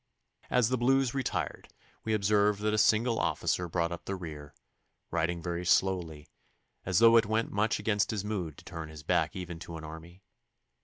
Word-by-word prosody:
As 125 -3 +3
the 130 -1 0
Blues 135 0 +2
retired 135 -2 -3 0.4
we 110 -1 0
observed 105 0 +2
that 105 0 +1
a - - +1
single 115 +2 +3
officer 90 -1 0
brought 85 0 0
up 85 - -7
the 100 - -3
rear, 75 -5 -8 0.6
riding 85 +1 -1
very 85 0 -3
slowly, 90 -5 +1 0.6
as 90 -2 +1
though 115 +2 +7
it 115 -3 +3
went 110 +1 0
much 105 +2 +1
against 105 -2 0
his 105 -2 -2
mood 90 -8 -3
to - - -15
turn 80 -2 -7
his 75 -1 -11
back - - +1
even 90 -3 -6
to 85 0 -8
an 80 - -9
army. 80 +4 -10
95 Hz, 185 wpm, -30 LUFS, 85-110 Hz, 0.6 s, though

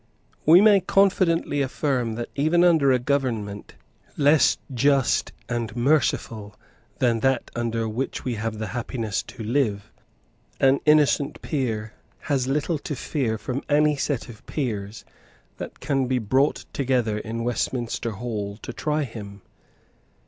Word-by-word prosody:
We 170 +4 +9
may 210 -2 +6
confidently 180 -6 +2
affirm 130 -4 -1
that, 120 +1 -5
even 155 +5 +2
under 160 -6 +5
a 130 - +4
government 120 -6 -2 0.4
less 145 +1 +4 0.2
just 135 +1 +2 0.2
and 120 -2 -3
merciful 120 -5 0 0.4
than 120 -3 +2
that 135 +3 0
under 115 -1 -1
which 115 +5 -4
we 125 - -1
have 110 0 -3
the 110 - -3
happiness 115 -4 -2
to 115 - -10
live, 110 -4 -1 0.7
an 135 +1 +4
innocent 150 -2 +3
peer 115 -7 -2 0.3
has 135 -4 0
little 150 +3 0
to 145 - -5
fear 120 -4 -2
from 130 +5 -4
any 150 0 +4
set 140 -2 -2
of 115 -4 -12
peers 110 -7 -4 0.5
that - - -8
can 135 -2 0
be 130 0 +1
brought 130 +6 +1
together 125 -6 0
in 115 +1 -4
Westminster 120 -1 -2
Hall 105 -2 -4
to 125 - -6
try 150 +3 -1
him. 100 -6 -9
125 Hz, 135 wpm, -24 LUFS, 110-145 Hz, 0.7 s, We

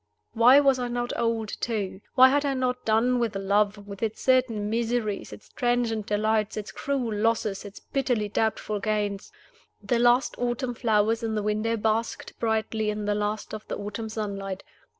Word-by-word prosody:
Why 245 +4 +7
was 275 -2 +3
I 245 - -1
not 240 0 -2
old 230 -2 -1
too? 205 -4 -2
Why 260 +1 +8
had 285 +2 +2
I 280 -2 0
not 250 -1 -1
done 235 +3 +3
with 230 -3 -1
love, 200 +1 +1
with 200 -1 -9
its 220 -1 -2
certain 250 -5 +2
miseries, 225 -2 -1
its 105 - -12
transient 240 -3 0
delights, 215 0 0
its 210 - -5
cruel 265 -5 -2
losses, 210 -2 0
its 200 0 -10
bitterly 245 -6 -1
doubtful 215 0 -1
gains? 205 -1 -2 0.5
The 240 -2 0
last 240 +2 +4
autumn 245 +1 -1
flowers 225 -1 +1
in 225 -1 -2
the 210 - -1
window 215 +2 0
basked 220 +1 -2
brightly 220 -1 0
in 210 0 -3
the 205 - +1
last 210 +1 -2
of 215 0 -7
the - - -4
autumn 210 +2 -5
sunlight. 200 -3 -4
220 Hz, 170 wpm, -26 LUFS, 210-240 Hz, 0.5 s, Why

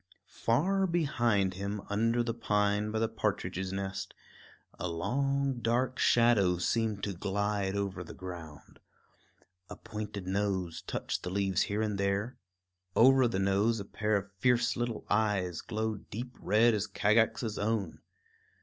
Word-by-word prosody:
Far 190 +11 +1
behind 120 - +1
him, 100 +2 -4
under 115 +3 +1
the 115 -1 -2
pine 105 -2 +1
by 110 - -2
the 115 +1 +2
partridge's 95 -4 -2
nest, 95 0 -4 0.6
a 90 - -2
long 135 +9 0
dark 125 +3 0
shadow 110 -7 +4
seemed 105 +2 0
to 100 - -1
glide 100 +1 -1
over 100 -3 -2
the 80 - -10
ground. 85 -5 -9 0.9
A - - -7
pointed 105 -3 -6
nose 95 -3 -1
touched - - -3
the - - -4
leaves 95 -1 +1
here 105 +2 0
and 105 -2 -2
there; 100 +5 -1 0.6
over, 130 +1 +6
the 115 - -2
nose 100 +4 +2
a 100 - -5
pair 105 +1 0
of 100 0 -6
fierce 120 -1 +3
little 120 -2 -3
eyes 100 -5 +1
glowed 110 -1 -3
deep 120 +4 -6
red 115 +2 +4
as 105 0 -1
Kagax's 110 +2 +1
own. 105 -4 -1
105 Hz, 140 wpm, -31 LUFS, 95-115 Hz, 0.9 s, over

